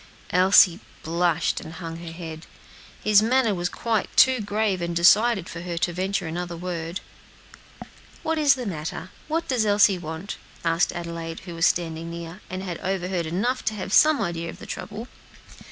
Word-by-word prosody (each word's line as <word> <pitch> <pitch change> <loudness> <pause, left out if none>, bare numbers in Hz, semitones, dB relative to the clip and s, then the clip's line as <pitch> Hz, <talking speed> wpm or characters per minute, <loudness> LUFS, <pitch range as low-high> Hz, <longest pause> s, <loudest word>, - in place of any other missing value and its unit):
Elsie 185 -1 +6 0.2
blushed 170 0 0
and 160 - -9
hung 165 -2 -6
her 170 -1 -8
head. 165 -1 -8 0.6
His 210 -1 +6
manner 230 -1 +3
was 175 -1 -1
quite 225 -3 -1
too 260 -1 +6
grave 205 -2 0
and 170 0 -2
decided 195 +3 +4
for 170 - -7
her 175 -1 -5
to 175 +1 0
venture 190 +1 -1
another 170 +1 -4
word. 170 +1 -4 1.2
"What 320 0 0
is 285 -2 +5
the 255 -2 -5
matter? 165 0 -5 0.2
what 325 +2 -1
does 250 -4 +1
Elsie 205 -2 +4
want?" 160 +4 -6 0.3
asked 165 +1 +2
Adelaide, 170 -1 -6
who 175 0 -8
was 165 0 +3
standing 165 -1 -1
near, 170 +3 -8
and 185 +1 -5
had 175 -3 -5
overheard 185 -2 -2
enough 235 +10 -1
to 220 - 0
have 195 0 -5
some 310 -1 +6
idea 170 -2 -3
of - - -8
the - - -10
trouble. 215 +3 -6
180 Hz, 170 wpm, -24 LUFS, 170-210 Hz, 1.2 s, Elsie